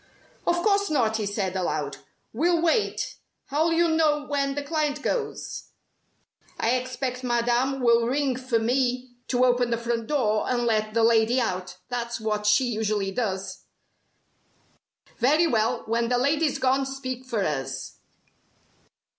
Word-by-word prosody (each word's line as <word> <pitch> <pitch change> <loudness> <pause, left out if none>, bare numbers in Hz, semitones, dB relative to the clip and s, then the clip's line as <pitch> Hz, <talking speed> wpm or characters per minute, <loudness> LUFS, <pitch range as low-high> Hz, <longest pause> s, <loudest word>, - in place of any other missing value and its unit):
"Of 345 - +4
course 400 -1 +2
not," 230 -7 +1
he 215 -2 -2
said, 195 -2 -2
aloud. 185 -2 -2 0.4
"We'll 345 0 +2
wait. 340 +6 0 0.3
How'll 310 +4 +2
you 340 +1 +3
know 310 -2 +2
when 275 -1 -1
the 290 - -2
client 295 -1 -1
goes?" - - -3 0.9
"I 230 - +2
expect 255 0 -2
Madame 245 +2 +1
will 235 -1 +4
ring 270 0 0
for 255 -2 -1
me 250 +2 0 0.2
to 250 0 +3
open 245 -1 +2
the 235 - 0
front 230 -1 -2
door, 225 -8 +1
and 245 -1 +1
let 215 -1 0
the 230 - +3
lady 230 +2 +4
out. 185 -5 -3
That's 235 -1 -3
what 210 -1 -1
she 210 +5 +5
usually 215 -4 -1
does." 190 -3 -3 1.5
"Very 295 +8 +4
well, 225 -8 +1
when 230 +1 0
the 245 - +2
lady's 290 +3 +1
gone 265 0 +1
speak 260 -2 -5
for 235 -6 -2
us." 135 -2 -4
245 Hz, 145 wpm, -25 LUFS, 225-275 Hz, 1.5 s, she